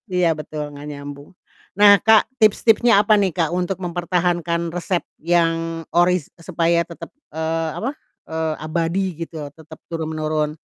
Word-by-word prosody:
Iya 180 -1 +2
betul, 150 -1 -6
gak 145 +1 -9
nyambung. 145 0 -9 0.5
Nah, 205 -1 +7
Kak, 220 -1 +5
tips-tipsnya 220 +1 +4
apa 210 +1 +3
nih 190 -2 +1
Kak, 165 -3 +1
untuk 180 +1 -1
mempertahankan 175 -1 -1
resep 175 0 -1 0.2
yang 165 0 0
oris 175 -3 +3
supaya 170 0 +1
tetap, 170 -1 -10 0.2
eee, 160 +1 -2
apa, 240 - -2 0.4
eee, 160 -1 -2
abadi 165 +4 -1 0.2
gitu, 160 -3 -7
tetap 160 0 -13
turun 165 -2 -4
menurun. 155 -1 -1
170 Hz, 140 wpm, -21 LUFS, 160-180 Hz, 0.5 s, Nah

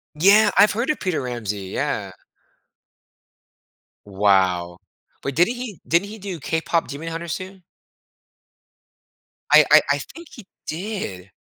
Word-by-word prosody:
Yeah, 200 +6 +5
I've 210 - +6
heard 235 +7 -1
of 305 - -1
Peter 185 -4 -1
Ramsey, 110 -6 -4
yeah. - - -3 2.0
Wow. 95 -3 +1 0.4
But 140 - -3
didn't 175 - +3
he 235 - -7
didn't 170 +5 +1
he 220 +1 -9
do 190 -3 -6
KPop 160 +3 -1
Demon 150 +4 -7
Hunters 165 0 -4
too? 190 0 -8 1.9
I - - +8
I - - +9
I - - +2
think 335 -1 -11
he 230 -10 -13 0.2
did. 155 - -5
165 Hz, 125 wpm, -22 LUFS, -, 2.0 s, I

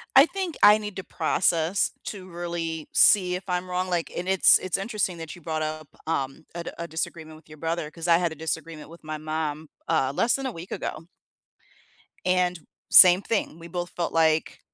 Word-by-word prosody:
I 270 +3 +9
think 375 -2 -5
I 210 +1 +8
need 210 -2 -7
to 190 - -5
process 170 +2 +1
to 190 -3 -7
really 170 -2 -5
see 180 -3 +5
if 180 - -6
I'm 180 0 -2
wrong, 185 +1 -2
like 175 -2 -2
and 180 +2 -4
it's 190 0 +6
it's 185 -1 -2
interesting 195 -4 -2
that 160 -1 -7
you 175 - -15
brought 155 0 -3
up, 155 -1 -4 0.2
um, 140 -2 -3
a 170 0 -5
d - - -5
a 170 - -5
disagreement 160 -1 -5
with 160 - -21
your 155 0 -13
brother, 165 -1 -3
'cause 165 +2 -6
I 165 - +6
had 175 -2 -1
a - - -12
disagreement 160 0 -5
with 170 -1 -15
my 155 0 -4
mom, 155 0 -4 0.2
uh, 135 -5 +1
less 235 +9 +2
than 270 0 -4
a 260 - -2
week 170 +1 -10
ago. 160 +2 -5 1.2
And 180 -1 +1 0.3
same 180 +1 +9
thing, 200 -7 -2
we 170 - -10
both 175 +1 -5
felt 170 - -3
like 160 -1 +1
170 Hz, 205 wpm, -25 LUFS, 160-185 Hz, 1.2 s, I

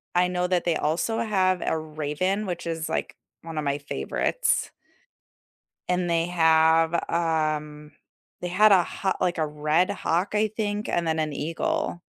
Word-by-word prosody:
I 180 0 +4
know 180 0 -1
that 180 -2 0
they 170 -2 +2
also 170 +10 0
have 190 -5 +1
a 160 - 0
raven, 155 +6 -2
which 175 -2 -4
is, 165 -1 -3
like, - - -3 0.3
one 165 -1 -8
of 150 - -1
my 140 0 0
favorites. 70 - -1 1.2
And 180 -1 0
they 165 0 +1
have, 160 -1 +4 0.2
um 155 -3 -1 0.5
they 180 - -2
had 205 +4 +5
a 185 -2 +7
ha 190 +2 -2
like, 180 -1 +1
a 155 - +1
red 150 +4 +1
hawk, 175 +6 -1
I 215 +1 +2
think, 210 0 -3
and 170 -1 0
then 160 0 0
an 155 -1 -1
eagle, 175 - -2
170 Hz, 165 wpm, -25 LUFS, 155-185 Hz, 1.2 s, a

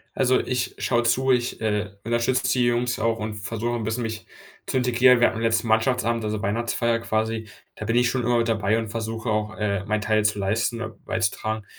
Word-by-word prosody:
Also, 130 -1 +3
ich 125 -1 -2
schaue 120 -1 +1
zu, 130 +3 +2
ich 125 -1 +1
äh, 105 -2 -1
unterstützt 120 +2 +1
d - - -1
die 120 - +3
Jungs 120 0 0
auch 115 +1 0
und 110 0 -4
versuche 115 +3 -3
'n 115 - -3
bisschen 110 +3 -2
mich 110 -1 -5 0.4
zu - - -2
integrieren. 125 0 +4
Wir 120 - +6
hatten 115 - -4
letzten 115 0 +1
Mannschaftsabend, 115 0 +1
also, 105 0 -2
Weihnachtsfeier 115 +2 0
quasi, 110 0 -2 0.3
da - - -6
bin 115 +2 0
ich 120 0 +4
schon 125 -3 -1
immer 120 -1 +3
dabei 110 -2 +1
und 115 -1 -3
versuche 115 +1 -3
auch, 105 0 -1
äh, 100 -2 -1
meinen 110 0 0
Teil 110 0 +1
zu 105 -1 +1
leisten 110 +4 -1 0.2
beizutragen. 110 +2 -2
115 Hz, 205 wpm, -24 LUFS, 110-120 Hz, 0.4 s, Wir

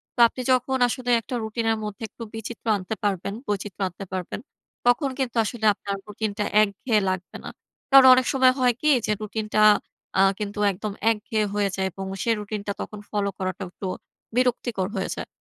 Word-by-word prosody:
তো, - - -9
আপনি 255 - -7
যখন 255 +1 +2
আসলে 245 +1 -4
একটা 245 - -5
রুটিনের 225 0 0
মধ্যে 210 +1 -6
একটু 230 - -10
বিচিত্র 225 +1 -7
আনতে 190 +3 -5
পারবেন 200 -1 -1
বৈচিত্র্য 205 -1 -3
আনতে 185 +2 -8
পারবেন। 185 +1 -4 0.5
তখন 245 +4 +3
কিন্তু 255 -3 -2
আসলে 220 0 -3
আপনার 200 0 -5
রুটিনটা 210 0 -3 0.2
একঘেয়ে 215 +2 +1
লাগবে 185 -1 -4
না। - - -6 0.4
কারণ 270 -1 +9
অনেক 255 0 +3
সময় 260 -1 +5
হয় 250 -1 +4
কি 305 - +3 0.2
যে, - - 0
রুটিনটা 215 0 -1 0.6
আ - - +7 0.2
কিন্তু 205 0 -4
একদম 205 +2 -5 0.2
একঘেয়ে 215 0 -1
হয়ে 205 -1 +1
যায় 190 0 0
এবং 195 +2 -6 0.2
সেই 230 -1 +2
রুটিন 210 0 -4
টা - - 0
তখন 210 - -7
ফলো 205 -1 0
করাটা 185 0 -3
একটু 190 +1 -7 0.5
বিরক্তিকর 240 -6 +1
হয়ে 190 - -2
যায়। - - -6
215 Hz, 180 wpm, -24 LUFS, 200-240 Hz, 0.6 s, কারণ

